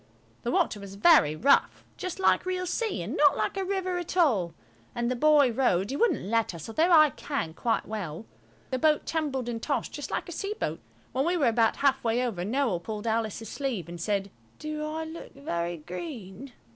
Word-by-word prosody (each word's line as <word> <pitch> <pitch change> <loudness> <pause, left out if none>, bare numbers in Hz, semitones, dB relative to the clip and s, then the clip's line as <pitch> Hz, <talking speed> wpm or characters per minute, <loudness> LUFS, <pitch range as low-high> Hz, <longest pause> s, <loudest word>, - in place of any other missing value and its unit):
The - - -3
water 345 - +1
was 200 -1 -9
very 200 - +5
rough 275 - +3
just 365 -2 -5
like 380 - +3
real 365 0 -1
sea, 440 +5 -2
and - - -4
not - - +5
like - - -1
a 390 - -1
river 370 -2 -1
at 350 +1 -5
all. 205 - +2 0.4
And 240 +1 0
the - - 0
boy 290 -1 +5
rowed; 220 -5 +1
he - - -2
wouldn't 470 - +2
let 225 -3 0
us, 165 - -8
although 320 +10 +2
I 310 -3 +7
can, 270 - -4
quite 225 +6 -1
well. 200 -4 -5 0.5
The 260 - 0
boat 305 +2 +3
tumbled 285 -6 -2
and 230 -1 -3
tossed 285 +2 -2
just 290 - -5
like - - -3
a - - -7
sea 400 +5 -3
boat. 155 +2 -2 0.3
When 260 +2 0
we 350 +3 +1
were 295 - +2
about 225 -1 +2
half 270 -1 +2
way 235 +2 +1
over, 210 -8 -3
Noël 225 -4 0
pulled 215 +2 -6
Alice's 225 -1 -1
sleeve 260 - -3
and 170 -1 -8
said– 200 0 -1 0.3
"Do 305 0 -4
I 315 +1 -3
look 320 +1 -9
very 175 - -3
green?" 200 - -8
255 Hz, 205 wpm, -28 LUFS, 205-310 Hz, 0.5 s, I